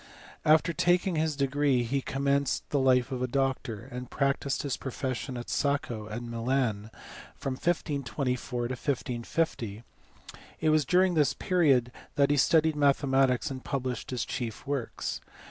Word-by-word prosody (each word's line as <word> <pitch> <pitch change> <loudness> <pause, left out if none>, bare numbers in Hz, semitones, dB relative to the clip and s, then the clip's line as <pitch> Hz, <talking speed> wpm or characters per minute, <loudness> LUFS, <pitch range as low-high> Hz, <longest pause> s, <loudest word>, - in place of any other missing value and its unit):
After 155 +2 +4
taking 180 +1 +2
his 155 -1 0
degree 140 -2 +2
he 135 +4 -1
commenced 140 +1 -1
life 130 -2 +3
as 125 -1 -3
a 125 - +1
doctor, 130 -4 -1
and 125 0 -6
practised 140 0 0
his 140 -3 -1
profession 130 -1 -4
at 120 - -6
Sacco 130 -7 -1
and 115 +3 -5
Milan 115 -3 -1 0.5
from 135 - -3
1524 130 -5 -2
to - - -3
1550; 120 -3 -2 0.8
it 160 - +2
uas 155 -1 +3
during 185 0 +4
this 150 -4 +2
period 140 -10 +2 0.2
that 140 0 +3
he 145 - +3
studied 160 +3 +4
mathematics 135 -3 +2
and 130 -1 -6
publi>hr<] 130 -2 -3
his 125 -2 -2
chief 120 0 -5
works. 140 -5 -3
135 Hz, 140 wpm, -29 LUFS, 125-145 Hz, 0.8 s, After